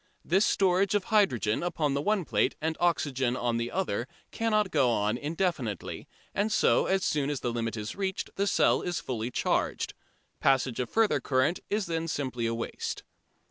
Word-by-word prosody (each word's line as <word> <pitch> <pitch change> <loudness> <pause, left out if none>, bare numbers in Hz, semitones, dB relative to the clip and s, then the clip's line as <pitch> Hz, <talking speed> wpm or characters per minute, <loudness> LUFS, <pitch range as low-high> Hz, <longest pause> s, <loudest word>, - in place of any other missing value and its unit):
This 190 +6 +3
storage 195 +1 +2
of 205 - +2
hydrogen 125 - +2
upon 160 -5 0
the 140 - 0
one 205 +1 +1
plate - - +1
and 160 +1 -1
oxygen 135 -7 +1
on 120 -1 0
the 115 0 -2
other 125 - -2 0.2
cannot 215 -4 +1
go 130 - +3
on 105 -1 +1
indefinitely, 145 - -3 0.3
and 210 +2 0
so - - +3
as 190 0 +1
soon 145 -2 0
as 145 -3 -2
the 120 - -1
limit 115 -1 -2
is 105 +1 -5
reached 190 -1 -3
the 200 +1 0
cell - - +3
is 175 -2 -2
fully 120 -2 -3
charged. - - -1 0.5
Passage 130 -3 +2
of 125 - -2
further 225 -1 +3
current 135 +6 +1
is 210 -1 0
then 165 -1 -2
simply 130 -7 -2
waste. 115 0 -4
150 Hz, 175 wpm, -29 LUFS, 120-190 Hz, 0.5 s, This